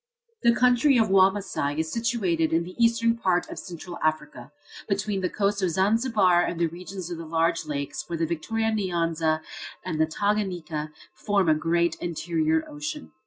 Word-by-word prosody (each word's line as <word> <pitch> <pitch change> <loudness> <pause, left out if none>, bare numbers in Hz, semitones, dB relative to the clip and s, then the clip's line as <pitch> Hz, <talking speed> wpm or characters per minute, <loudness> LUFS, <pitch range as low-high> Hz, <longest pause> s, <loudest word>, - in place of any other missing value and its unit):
The 235 0 +4
country 250 +2 +4
of 225 -3 +3
Wamasai 190 -7 +2
is 160 0 -1
situated 190 -9 0
in 165 +1 +2
the 180 +2 -9
eastern 230 0 +3
part 185 -6 +1
of - - -6
Central 175 0 -8
Africa, 155 -1 -2 0.4
between 200 0 -1
the 180 - 0
coast 200 0 0
of 185 - +2
Zanzibar 195 0 +3
and 175 -1 -2
the 170 - +3
regions 180 +2 -7
of 170 - -5
the 165 - -6
large 165 0 0
lakes, 140 -2 -4
where 170 - -2
the 165 - +1
Victoria 220 +8 -1
Nyanza 165 -6 0 0.4
and 160 -4 -1
the 160 - +3
Tanganiyka 175 -5 -2 0.2
form 200 -5 +1
a - - +6
great 165 +2 +1
interior 160 -2 0
ocean. 145 - -6
175 Hz, 165 wpm, -26 LUFS, 160-205 Hz, 0.4 s, a